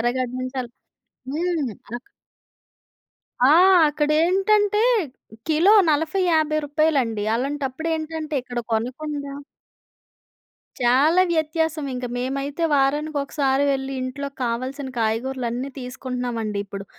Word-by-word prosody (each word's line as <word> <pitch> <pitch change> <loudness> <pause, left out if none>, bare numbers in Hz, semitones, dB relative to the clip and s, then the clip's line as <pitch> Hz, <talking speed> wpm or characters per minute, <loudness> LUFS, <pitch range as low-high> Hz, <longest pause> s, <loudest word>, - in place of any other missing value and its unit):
ఎరగడ్డ 245 +1 0
నుంచి 255 +1 -5
అల్ 240 - -11 0.6
హ్మ్. 320 -5 -1 0.2
అనక 240 +2 -7 1.4
ఆ! - - +6 0.4
అక్కడ 295 0 -1
ఏంటంటే 410 +4 +2 0.7
కిలో 325 +6 +4 0.2
40,50 315 0 +1
రూపాయలండి. 285 -7 +1
అలాంటప్పుడు 275 +4 -2
ఏంటంటే 315 -1 -5
ఇక్కడ 245 -1 -6
కొనకుండా 280 +5 -3 1.5
చాలా 275 +9 +4
వ్యత్యాసం 320 -1 0
ఇంక. 250 0 -4
మేమైతే 275 +5 -2
వారానికి 295 +2 +1
ఒకసారి 280 -1 0
వెళ్లి 270 0 -2
ఇంట్లోకి 275 +2 -5
కావాల్సిన 255 +4 -3
కాయగూరలన్నీ 240 +3 -1
తీసుకుంటున్నామండి 250 -4 -4
ఇప్పుడు. 200 0 -7
275 Hz, 95 wpm, -23 LUFS, 250-310 Hz, 1.5 s, ఆ